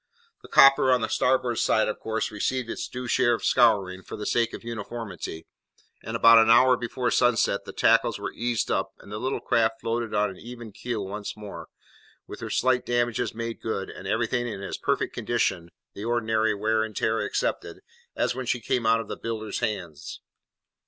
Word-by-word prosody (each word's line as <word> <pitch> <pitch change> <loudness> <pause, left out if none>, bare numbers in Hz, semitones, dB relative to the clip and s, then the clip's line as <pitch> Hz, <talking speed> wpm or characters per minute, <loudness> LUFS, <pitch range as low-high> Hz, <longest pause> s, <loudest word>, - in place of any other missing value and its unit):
The - - -13
copper 135 -1 +6
on 125 -1 +3
the 110 - 0
starboard 125 -2 +1
side, 110 - +2
of 105 - -3
course, 110 +1 -2
received 115 +3 -2
its - - -4
due 125 0 -6
share 120 -1 +3
of - - -6
scouring, 95 -2 +3
for - - -9
the 105 - -6
sake 115 -1 +1
of - - -9
uniformity; 110 -7 -6 0.6
and - - -5
about 115 0 +7
an 115 0 +4
hour 125 +2 +6
before 125 +1 -2
sunset, 120 -2 +2
the - - -7
tackles - - +3
were - - -5
eased 120 -2 -1
up, - - -1
and 100 - -15
the 105 - -4
little 130 +3 -2
craft 115 -1 +1
floated 115 -1 -2
on 105 -1 +1
an 95 - -12
even 120 0 -10
keel 105 0 -4
once 105 +2 -6
more, 105 -1 -9 0.6
with - - -9
her - - -6
slight 130 -1 +2
damages 120 -2 -1
made 115 0 -5
good, 95 -4 -3
and 95 - -9
everything 120 +3 0
in 100 -4 -6
as - - -4
perfect - - -1
condition 95 -8 -1 0.2
(the 100 - -8
ordinary 110 -2 +1
wear 110 +2 +1
and 110 -2 -6
tear 110 0 +1
excepted) - - -2 0.3
as - - 0
when 130 0 -5
she 125 - 0
came 115 0 -1
out 115 0 +4
of 110 - -10
the - - -5
builders 110 -2 -4
hands. 85 -8 -4
115 Hz, 195 wpm, -26 LUFS, 105-120 Hz, 0.6 s, about